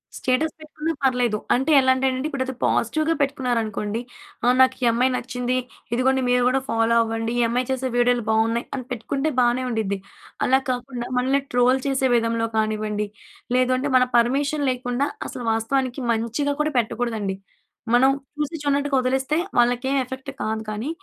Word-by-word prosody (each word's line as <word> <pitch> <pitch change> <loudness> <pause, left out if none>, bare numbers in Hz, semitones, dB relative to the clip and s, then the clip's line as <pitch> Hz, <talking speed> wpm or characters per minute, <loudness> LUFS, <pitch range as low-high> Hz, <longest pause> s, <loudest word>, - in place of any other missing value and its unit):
Status 265 +5 0
పెట్టుకున్నా 310 +1 -4
పర్లేదు. 250 -4 +2 0.2
అంటే 265 +5 +1
ఎలా 260 -1 +4
అంటే 265 +1 +1
నండి 260 +3 -2
ఇప్పుడు 275 -3 -2
అది 260 - -4
పాజిటివ్‌గా 310 +8 +1
పెట్టుకున్నారనుకోండి, 230 -6 -1 0.4
ఆ! - - +3
నాకు 260 0 +5
ఈ - - +4
అమ్మాయి 250 +3 +2
నచ్చింది. 250 0 -2 0.4
ఇదిగోండి 260 +2 +2
మీరు 250 0 +3
కూడా 265 +1 +1
ఫాలో 225 0 +2
అవ్వండి. 225 0 -2
ఈ - - +4
అమ్మాయి 245 +2 -1
చేసే 260 0 -1
వీడియోలు 245 0 +3
బావున్నాయి, 225 +2 +1
అని 255 -3 -5
పెట్టుకుంటే 270 +6 -2
బానే 245 +1 +2
ఉండిద్ది. 215 -4 -1 0.5
అలా 260 +1 +4
కాకుండా, 245 -1 -4
మనల్ని 265 +3 +2
ట్రోల్ 250 +2 +3
చేసే 265 -1 +1
విధంలో 230 0 +1
కానివ్వండి, 215 -1 -1 0.5
లేదంటే 255 +2 +1
మన 250 - +4
పర్మిషన్ 280 +5 +1
లేకుండా 245 +2 -1 0.2
అసలు 245 - -6
వాస్తవానికి 255 +3 -1
మంచిగా 235 +6 -1
కూడా 305 0 -1
పెట్టకూడదండి. 225 -4 -2 0.6
మనం 255 +2 +6 0.3
చూసి 300 +2 -2
చూడనట్టుగా 285 -1 +1
వదిలేస్తే 265 +3 0 0.2
వాళ్ళకేం 245 +3 +2
ఎఫెక్ట్ 260 +1 -8
కాదు. 220 0 -2
కానీ, 215 +6 -3
250 Hz, 155 wpm, -23 LUFS, 230-265 Hz, 0.6 s, మనం